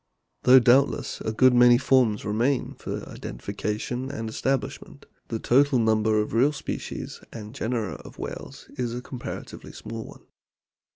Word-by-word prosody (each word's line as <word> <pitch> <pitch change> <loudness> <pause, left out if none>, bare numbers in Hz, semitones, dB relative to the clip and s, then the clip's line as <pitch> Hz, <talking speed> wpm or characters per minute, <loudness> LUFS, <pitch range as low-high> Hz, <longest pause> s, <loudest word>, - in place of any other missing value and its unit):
Though 130 +1 +7
doubtless 130 +3 +3
a - - -1
good 130 +3 +5
many 120 0 +7
forms 125 -5 +2
remain 120 +6 0
for - - -6
identification 110 - -4
and 125 -5 -4
establishment, 135 +3 -3 0.2
the 115 - -3
total 135 +4 +3
number 110 -1 +2
of 105 - -2
real 130 +6 +3
species 140 - -6
and 110 -1 -8
genera 115 -6 -2
of - - -13
whales 140 +2 -7
is 120 -1 -1
a 125 - -4
comparatively 125 -1 -8
small 115 -1 -7
one. - - -14
120 Hz, 140 wpm, -25 LUFS, 110-130 Hz, 0.2 s, Though